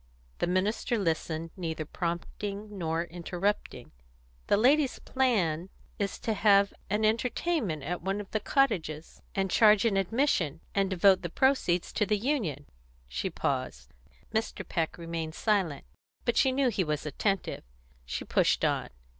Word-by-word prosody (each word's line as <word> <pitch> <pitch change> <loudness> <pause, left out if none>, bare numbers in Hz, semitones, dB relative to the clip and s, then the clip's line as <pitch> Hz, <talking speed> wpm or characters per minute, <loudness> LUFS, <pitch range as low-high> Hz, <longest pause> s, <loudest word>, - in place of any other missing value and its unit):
The - - +1
minister 205 +6 0
listened, 165 -3 -1
neither 160 -4 -3
prompting 200 +6 -4
nor 165 -2 -1
interrupting. 175 - -3 0.6
"The - - +4
ladies' 270 +4 +4
plan 190 - 0 0.3
is 200 -2 -1
to 225 - 0
have 200 -1 +4 0.2
an 210 +2 +1
entertainment 230 - 0
at 175 +4 -3
one 195 +3 -1
of 205 - -8
the 215 - 0
cottages, 185 - 0
and 195 -2 0
charge 215 -1 +6
an 210 -4 +2
admission, 195 - +1
and 195 -1 +1
devote 190 0 +4
the 175 - -4
proceeds 180 - +1
to 210 - +1
the 210 - +2
union." 200 - -1 0.4
She - - -3
paused. - - -3 0.4
Mr. 220 +1 -2
Peck 165 -4 -1
still 170 - -10
remained 165 -1 -4
silent, 190 -10 0 0.4
but 235 - +1
she 265 - +4
knew 265 0 +2
he 200 -5 0
was 150 -2 -2
attentive. 195 +6 -1 0.4
She - - -4
pushed - - +2
on. - - 0
195 Hz, 145 wpm, -29 LUFS, 165-220 Hz, 0.6 s, charge